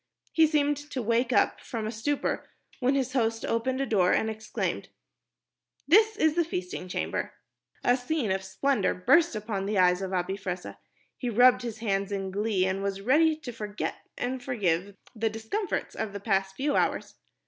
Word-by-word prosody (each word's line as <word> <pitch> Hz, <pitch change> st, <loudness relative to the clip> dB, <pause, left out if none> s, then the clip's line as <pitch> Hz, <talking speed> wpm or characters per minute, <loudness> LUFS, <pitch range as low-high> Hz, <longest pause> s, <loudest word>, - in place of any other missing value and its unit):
He 320 Hz, -1 st, +5 dB
seemed 295 Hz, -1 st, +2 dB
to 290 Hz, -2 st, -6 dB
wake 235 Hz, +2 st, +1 dB
up 250 Hz, -, +3 dB
from 225 Hz, -4 st, -4 dB
a 215 Hz, -, -2 dB
stupor 270 Hz, +6 st, -2 dB, 0.3 s
when 260 Hz, +1 st, +2 dB
his 265 Hz, -2 st, -1 dB
host 225 Hz, -3 st, 0 dB
opened 255 Hz, +3 st, 0 dB
a -, -, +1 dB
door 190 Hz, -7 st, +3 dB
and 220 Hz, -, +1 dB
exclaimed, 220 Hz, 0 st, -3 dB, 1.0 s
"This 430 Hz, +7 st, +5 dB
is 315 Hz, -4 st, +3 dB
the 340 Hz, +1 st, +2 dB
feasting 180 Hz, -, -5 dB
chamber." 180 Hz, -, -3 dB, 0.5 s
A 245 Hz, -, +4 dB
scene 250 Hz, -3 st, -1 dB
of 190 Hz, 0 st, -1 dB
splendor 200 Hz, +3 st, 0 dB
burst 275 Hz, -, +4 dB
upon 210 Hz, -2 st, -3 dB
the 210 Hz, 0 st, 0 dB
eyes 180 Hz, 0 st, +4 dB
of 190 Hz, -1 st, -3 dB
Abi 185 Hz, +1 st, -1 dB
Fressah. 185 Hz, -2 st, -5 dB, 0.4 s
He 250 Hz, -, -2 dB
rubbed 245 Hz, +3 st, +5 dB
his 235 Hz, -3 st, -5 dB
hands 200 Hz, -2 st, -1 dB
in 195 Hz, -1 st, -3 dB
glee 200 Hz, -1 st, +1 dB
and 190 Hz, +1 st, -1 dB
was 195 Hz, 0 st, -2 dB
ready 305 Hz, +9 st, +4 dB
to 295 Hz, -5 st, -8 dB
forget 210 Hz, -2 st, -4 dB, 0.2 s
and 255 Hz, +1 st, -2 dB
forgive 200 Hz, -6 st, -1 dB, 0.2 s
the 225 Hz, 0 st, 0 dB
discomforts 225 Hz, -, -3 dB
of 205 Hz, -, -4 dB
the 200 Hz, -, -5 dB
past 195 Hz, -2 st, 0 dB
few 285 Hz, +2 st, 0 dB
hours. -, -, 0 dB
225 Hz, 180 wpm, -28 LUFS, 195-265 Hz, 1.0 s, He